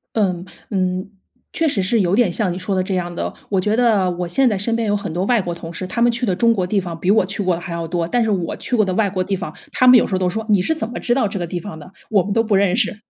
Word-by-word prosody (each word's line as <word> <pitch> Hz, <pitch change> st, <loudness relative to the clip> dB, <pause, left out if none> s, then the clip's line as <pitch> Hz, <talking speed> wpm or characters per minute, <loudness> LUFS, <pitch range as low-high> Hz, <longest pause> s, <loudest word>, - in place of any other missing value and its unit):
嗯， 185 Hz, -5 st, 0 dB, 0.3 s
嗯， 185 Hz, -1 st, -1 dB, 0.4 s
确 325 Hz, -, +1 dB
实 215 Hz, -10 st, +1 dB
是 220 Hz, +5 st, +2 dB
有 185 Hz, 0 st, +1 dB
点 235 Hz, -4 st, +3 dB
像 185 Hz, 0 st, 0 dB
你 -, -, -5 dB
说 190 Hz, +1 st, -2 dB
的 185 Hz, -, +2 dB
这 190 Hz, -, -2 dB
样 175 Hz, -1 st, -2 dB
的。 175 Hz, -, -4 dB
我 195 Hz, -2 st, +1 dB
觉 210 Hz, +3 st, 0 dB
得 220 Hz, -6 st, +3 dB
我 175 Hz, 0 st, -4 dB
现 260 Hz, +9 st, +3 dB
在 210 Hz, -, 0 dB
身 225 Hz, +4 st, -1 dB
边 230 Hz, -1 st, -1 dB
有 205 Hz, 0 st, +1 dB
很 200 Hz, -, -5 dB
多 180 Hz, +3 st, -1 dB
外 230 Hz, -1 st, +2 dB
国 175 Hz, -, -4 dB
同 170 Hz, 0 st, -9 dB
事， 185 Hz, -, -5 dB
他 235 Hz, -, -3 dB
们 240 Hz, 0 st, +5 dB
去 235 Hz, +2 st, -1 dB
的 195 Hz, -6 st, +1 dB
中 230 Hz, +2 st, +3 dB
国 190 Hz, -4 st, 0 dB
地 195 Hz, +3 st, 0 dB
方 170 Hz, -3 st, -6 dB
比 185 Hz, +3 st, 0 dB
我 210 Hz, -3 st, +4 dB
去 200 Hz, +1 st, -3 dB
过 180 Hz, -2 st, +1 dB
的 170 Hz, -, -7 dB
还 175 Hz, -, -7 dB
要 170 Hz, 0 st, -3 dB
多。 170 Hz, 0 st, -1 dB
但 240 Hz, +8 st, +1 dB
是 225 Hz, -, 0 dB
我 180 Hz, -5 st, -1 dB
去 245 Hz, -, -2 dB
过 215 Hz, -, +4 dB
的 185 Hz, -2 st, -2 dB
外 205 Hz, -1 st, +1 dB
国 185 Hz, -1 st, -1 dB
地 195 Hz, +1 st, -2 dB
方， 195 Hz, -, -5 dB, 0.2 s
他 255 Hz, -, +4 dB
们 250 Hz, 0 st, +9 dB
有 -, -, +2 dB
时 -, -, -9 dB
候 -, -, +1 dB
都 180 Hz, -1 st, 0 dB
说 220 Hz, +3 st, -4 dB
“你 205 Hz, -4 st, +3 dB
是 260 Hz, -, 0 dB
怎 305 Hz, -8 st, -4 dB
么 235 Hz, -, -6 dB
知 240 Hz, -, +1 dB
道 255 Hz, -4 st, +1 dB
这 200 Hz, 0 st, -3 dB
个 175 Hz, -, -3 dB
地 175 Hz, +1 st, -4 dB
方 200 Hz, -2 st, -8 dB
的？ 180 Hz, +5 st, -13 dB, 0.2 s
我 200 Hz, -3 st, +4 dB
们 200 Hz, -, -4 dB
都 225 Hz, +2 st, +2 dB
不 215 Hz, -2 st, 0 dB
认 195 Hz, -1 st, +3 dB
识。” 225 Hz, -3 st, +1 dB
195 Hz, 360 characters per minute, -19 LUFS, 180-225 Hz, 0.4 s, 们